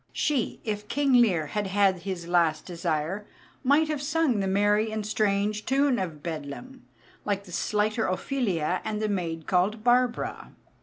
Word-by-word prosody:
She, 280 -7 0
if 210 -1 -4
King 280 +1 +1
Lear 205 -11 +4
had 205 +6 -2
had 190 -1 +2
his 175 -2 -5
last 170 -3 +2
desire, 170 +3 -2 0.4
might 285 +4 +4
have 305 -2 -2
sung 295 -5 +1
the 195 - 0
merry 205 +3 +2
and 215 -1 -3
strange 210 0 0
tune 270 -1 +2
of 160 -6 -5
Bedlam, 165 - -7 0.4
like 200 -1 -1
the 185 - -13
slighter 215 +4 0
Ophelia 185 - -1
and 210 -1 -3
the 215 - 0
maid 165 -5 -3
called 200 +4 +1
Barbara. 245 0 +1
205 Hz, 155 wpm, -27 LUFS, 180-240 Hz, 0.4 s, Lear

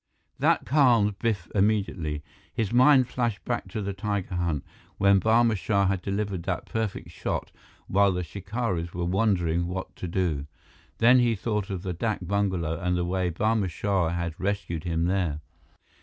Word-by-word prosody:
That - - +2
calmed 120 -8 +3
Biff 105 -8 -1
immediately. 95 -7 0 0.3
His 110 -1 -2
mind 130 0 +6
flashed 120 -5 -2
back 120 - -2
to 110 -3 -4
the 100 0 -3
tiger 100 -1 -3
hunt, 85 -5 -1 0.3
when 100 0 +5
Barma 115 +2 +3
Shah 100 0 +1
had 95 -1 0
delivered 100 -1 -2
that 90 0 -3
perfect 110 -3 -3
shot - - -3 0.3
while 100 +1 +3
the 90 0 -2
shikaris 95 -1 -3
were 90 -1 -1
wondering 90 -3 +1
what 95 +1 -5
to 90 - -4
do. 85 -5 -1 0.5
Then 120 +2 +6
he 120 -2 +3
thought 105 -1 -2
of 95 -2 -4
the 90 -2 -2
dak 105 +1 -2
bungalow 95 -4 0
and 90 -1 0
the 90 - 0
way 90 0 0
Barma 105 +2 +1
Shah 95 0 0
had 85 -1 -2
rescued 95 -4 -2
him 85 -1 0
there. 90 -5 0
95 Hz, 165 wpm, -26 LUFS, 85-110 Hz, 0.5 s, mind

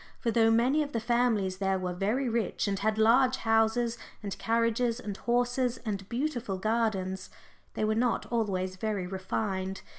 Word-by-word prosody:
For 235 - 0
though 225 -1 +4
many 245 +7 +3
of 290 -1 -3
the 230 - 0
families 225 -5 +1
there 195 0 +1
were 180 -1 -3
very 215 +9 0
rich, 230 -2 -1
and 195 -1 -1
had 215 +1 0
large 250 +4 +5
houses 225 +1 +1 0.2
and 200 -2 -4
carriages 230 +1 +1
and 205 -5 -5
horses 245 +2 0
and 200 -3 -4
beautiful 240 -6 -2
gardens, 200 -3 -1 0.5
they - - -1
were 215 - +2
not 235 +2 +1
always 190 -5 -1
very 205 -2 -2
refined. 190 0 -3
225 Hz, 160 wpm, -29 LUFS, 195-240 Hz, 0.5 s, large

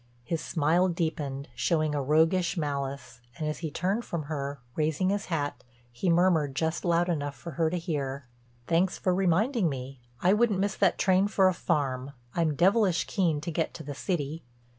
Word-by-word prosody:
His 165 +5 -2
smile 165 +4 +2
deepened, 155 -5 -2
showed 155 -3 +1
a 145 - 0
roguish 165 +6 +2
malice, 140 -5 -3 0.2
and 155 - -2
as 150 - -3
he 160 - -3
turned 195 +9 -1
from 170 -7 -4
her, 140 -2 -4 0.2
raising 160 +4 +1
his 205 0 -1
hat, 145 -5 -3 0.3
he 120 +10 -1
murmured 165 -5 +3
just 160 +3 -1
loud 175 0 +2
enough 145 -5 -2
for 170 - -8
her 160 +1 +1
to 180 - -2
hear: 140 -6 -3 0.4
"Thanks 175 +2 +2
for 185 - +1
reminding 190 - +2
me. 130 -1 -6 0.2
I 180 +7 +4
wouldn't 215 -2 +3
miss 200 0 0
that 195 -3 +3
train 190 +1 +3
for 195 -2 +3
a - - 0
farm—I'm 140 -1 -2
devilish 190 +1 +3
keen 165 -7 0
to 170 - -4
get 160 0 -2
to 160 - -7
the 145 0 -5
city." 155 -1 -3
165 Hz, 180 wpm, -28 LUFS, 145-180 Hz, 0.4 s, I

